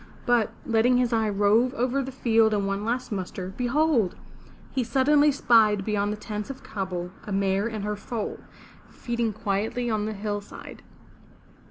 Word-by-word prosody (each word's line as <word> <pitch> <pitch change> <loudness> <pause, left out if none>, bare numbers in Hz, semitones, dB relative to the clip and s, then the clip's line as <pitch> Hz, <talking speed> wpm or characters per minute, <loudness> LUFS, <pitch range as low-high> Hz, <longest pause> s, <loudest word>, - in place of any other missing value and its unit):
But, 240 -3 +2
letting 240 0 +3
his 245 -1 +1
eye 220 -1 +2
rove 210 +6 +3
over 255 +2 0
the 265 0 -5
field 225 -4 +3
in 200 -1 0
one 195 +1 -2
last 245 +3 -2
muster, 190 -1 -4
behold! 250 - +1 0.6
he 260 - 0
suddenly 290 +4 +4
spied 215 -7 +4
beyond 205 -1 0
the 210 - -4
tents 210 +1 -5
of 270 - -8
Kabul, 180 -3 -4
a - - -8
a - - -4
mare 195 +1 +1
and 220 -3 -4
her 210 0 -2
foal, 215 +1 -5 0.5
feeding 235 -2 -2
quietly 215 +5 -2
on 215 -1 0
the 220 - -3
hillside. 205 0 -6
220 Hz, 165 wpm, -26 LUFS, 205-245 Hz, 0.6 s, suddenly